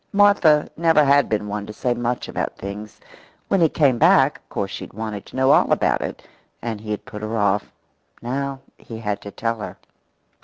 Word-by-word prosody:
Martha 200 -7 +5
never 160 -2 +4
had 140 +1 +4
been 105 -1 -1
one 105 0 -4
to 105 - -7
say 125 +3 0
much 120 +1 -2
about - - -4
things. 100 +2 -8 0.5
When 195 - +2
he 165 - +5
came 135 -7 +2
back, 160 -4 +5
of - - -40
course 95 -1 -3
she - - -6
had - - -16
wanted 110 -1 -5
to - - -13
know 130 +1 +4
all - - +4
about - - +2
it, - - -6 0.3
and 115 -3 -5
he 110 - -9
had 105 - -3
put 110 -5 -8
her 110 +1 -3
off. 100 -1 +1 0.5
Now 135 +2 -3 0.2
he 115 - -9
had 105 -2 -3
to 100 - -8
tell 115 +2 -3
her. 105 - -7
115 Hz, 205 wpm, -22 LUFS, 105-140 Hz, 0.5 s, Martha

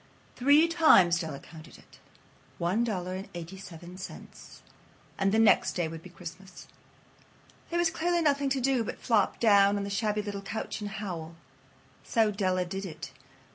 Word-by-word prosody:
Three 285 +6 +5
times 250 - +5
Della 160 -5 -5
counted 160 0 -13
it. - - -20 0.6
One 185 +7 0
dollar 185 -5 -3
and 190 +1 -6
eighty 175 +2 -7
seven 180 -1 -11
cents. 190 - -11 0.6
And 195 0 +2
the 220 - +2
next 225 -2 +4
day 175 -2 -1
would 160 0 -8
be 185 - -12
Christmas. 180 +2 -11 1.0
There 345 - -1
was 345 -1 +2
clearly 340 +1 0
nothing 280 -2 +2
to 270 0 0
do 260 -2 +1
but - - -6
flop 220 -5 +1
down 200 -2 +5
on 200 - -2
the 200 - -5
shabby 210 0 0
little 200 -1 -5
couch 205 +2 -5
and 205 - -4
howl. 175 -6 -6 0.7
So 225 -3 +2
Della 185 -3 0
did 195 +2 -5
it. 175 -5 -8
200 Hz, 170 wpm, -29 LUFS, 180-230 Hz, 1.0 s, Three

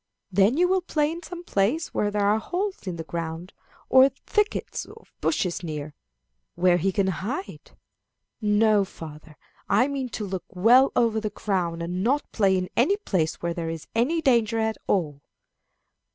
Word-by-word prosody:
"Then 200 +8 +3
you 360 +1 +4
will 375 0 +2
play 305 -3 0
in 335 +1 -6
some 345 +1 -8
place 255 - 0
where 205 - +1
there 205 0 0
are 210 +2 +3
holes 370 - -3
in 180 - -3
the 165 - -5
ground, 165 +2 -5 0.3
or 260 +1 +7
thickets 420 +10 -2
of - - -16
bushes 180 - 0
near, 150 -3 -5 0.6
where 175 0 +4
he 190 +3 0
can 200 0 +1
hide." 200 - -5 0.6
"No, 210 0 +3
father, 155 -4 -11 0.3
I 250 - +4
mean 275 -3 -3
to 210 - -4
look 190 -2 -5
well 230 +8 +5
over 230 -2 +2
the 215 - -2
ground, 180 -5 -2
and 180 +2 -3
not 280 +6 0
play 195 -3 +3
in 185 0 -2
any 360 +12 +3
place 180 - -1
where 170 0 0
there 165 -1 -4
is 165 -1 -6
any 300 +9 +1
danger 235 -3 +3
at 220 0 0
all." 150 -7 0
210 Hz, 170 wpm, -25 LUFS, 175-265 Hz, 0.6 s, or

